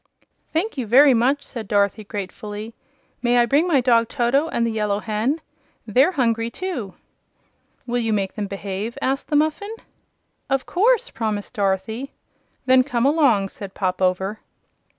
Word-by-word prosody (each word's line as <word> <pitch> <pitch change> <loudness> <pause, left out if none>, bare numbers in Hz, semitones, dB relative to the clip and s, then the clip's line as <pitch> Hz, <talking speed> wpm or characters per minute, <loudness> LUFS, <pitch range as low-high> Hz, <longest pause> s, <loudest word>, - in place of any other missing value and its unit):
"Thank 330 -1 -1
you 240 - -3
very 270 +5 +7
much," 260 +5 +2
said 230 -5 -7
Dorothy, 200 +1 +1
gratefully. 210 +2 -6 0.5
"May 245 0 +2
I 240 - +5
bring 285 +8 +2
my 290 -7 +3
dog 235 -2 +3
Toto, 270 +5 +1
and 235 - 0
the 230 - 0
Yellow 210 -2 0
Hen? 225 +9 -1 0.4
They're 260 - +3
hungry, 230 -5 +1
too." 245 - -5 0.9
"Will 245 0 -1
you 225 -2 0
make 195 -3 -1
them 210 -2 -4
behave?" 200 +3 -5
asked 270 +1 -1
the 300 - -1
Muffin. 315 +9 0 0.7
"Of 270 -1 0
course," 450 +6 +2
promised 215 -2 -3
Dorothy. 205 +5 -2 0.5
"Then 260 0 +5
come 250 -3 -1
along," 270 -10 +3
said 195 -1 -9
Pop 185 -1 -2
Over. 190 +3 0
235 Hz, 150 wpm, -22 LUFS, 205-275 Hz, 0.9 s, very